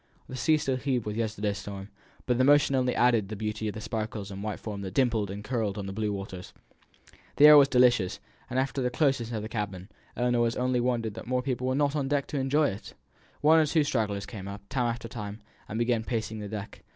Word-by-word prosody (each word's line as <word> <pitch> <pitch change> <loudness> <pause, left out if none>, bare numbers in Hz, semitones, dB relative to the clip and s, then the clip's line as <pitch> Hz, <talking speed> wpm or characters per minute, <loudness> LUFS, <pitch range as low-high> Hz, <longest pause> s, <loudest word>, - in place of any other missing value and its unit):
The 130 - -7
sea 155 +4 +3
still 135 -3 -1
heaved 130 -3 -1
with 105 0 -3
yesterday's 105 -2 -2
storm, 100 0 -7 0.4
but 125 -1 +1
the - - +5
motion 145 0 +5
only 125 -1 +1
added 120 -4 +3
to - - -13
the 110 - -5
beauty 105 +1 -3
of 105 - -4
the 110 - -6
sparkles 110 -3 -4
and 100 0 -7
white 105 0 -4
foam 105 -2 -6
that 95 -1 -6
dimpled 115 -6 +2
and 100 +2 -6
curled 110 -4 -2
on 100 - -4
the 95 - -5
blue 105 0 -1
waters. 95 -2 -7 0.8
The 145 - +7
air 150 0 +11
was 140 -2 +8
delicious, 125 -8 +3 0.3
after 130 +2 -1
the 125 - +1
closeness 135 -4 +1
of 110 -2 -3
the - - -4
cabin, 105 -4 -5 0.3
and 125 0 +1
Ellinor 120 0 +1
only 125 0 +1
wondered 120 -3 0
that 115 +2 -9
more 125 0 0
people 130 -1 -2
were 130 - +1
not 145 0 +1
on 140 -3 0
deck 140 0 0
to 145 - -2
enjoy 145 +3 +2
it. 100 - -8 0.5
One 160 +2 +6
or 155 - +4
two 155 +1 +3
stragglers 105 -7 -1
came 100 -5 -8
up, 100 0 -8
time 125 -3 0
after 115 0 -3
time, 105 -2 -7 0.3
and 110 - -4
began 120 -1 +1
pacing 110 -2 -3
the 105 -1 -6
deck. 105 -1 -7
115 Hz, 235 wpm, -28 LUFS, 105-130 Hz, 0.8 s, air